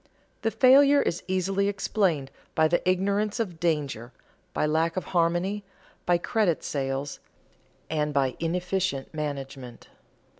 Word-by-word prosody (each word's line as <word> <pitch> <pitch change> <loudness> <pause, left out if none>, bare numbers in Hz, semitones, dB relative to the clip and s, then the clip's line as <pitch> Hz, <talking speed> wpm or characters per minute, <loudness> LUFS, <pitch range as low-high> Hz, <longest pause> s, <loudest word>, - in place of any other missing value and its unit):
The 225 - +1
failure 275 +5 +6
is 175 - -2
easily 190 +1 0
explained 190 -8 0 0.2
by 160 0 +4
the 175 +2 +1
ignorance 200 +4 0
of 180 -8 -3
danger, 145 -8 -1 0.4
by - - 0
lack 160 +3 +1
of 185 - -1
harmony, 175 +4 +1 0.4
by 175 -1 +4
credit 180 -1 0
sales, 135 0 -3 0.7
and 150 -1 -1
by 135 -3 +1
inefficient 180 -3 -1
management. 135 -5 -6
170 Hz, 120 wpm, -26 LUFS, 145-195 Hz, 0.7 s, failure